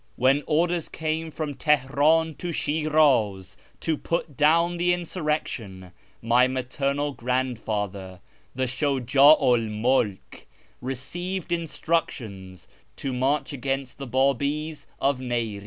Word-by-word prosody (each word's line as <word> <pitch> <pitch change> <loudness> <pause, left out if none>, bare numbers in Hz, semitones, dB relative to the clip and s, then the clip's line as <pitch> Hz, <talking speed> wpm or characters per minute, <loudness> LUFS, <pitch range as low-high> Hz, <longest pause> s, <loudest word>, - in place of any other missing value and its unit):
When 135 +3 +3
orders 170 +1 +1
came 160 +1 -3
from 155 -1 -4
Teheran 150 +3 +2
to 175 - -3
Shiraz 145 - +1 0.3
to 160 -2 -1
put 165 -4 -3
down 170 +4 +3
the 175 +1 +2
insurrection, 150 - -3 0.3
my 120 +2 +4
maternal 140 +3 -2
grandfather, 110 -7 -3 0.4
the 130 - -1
Shujd'u 135 +2 +4
1 115 -3 +2
MuIJc, 110 -2 -1 0.4
received 170 +9 -4
instructions 125 - -3 0.3
to 135 - -4
march 135 +3 0
against 135 -1 -3
the 135 - -6
Babis 140 +4 0
of 140 -1 +1
Niri'z. 120 -5 -2
135 Hz, 105 wpm, -25 LUFS, 125-155 Hz, 0.4 s, my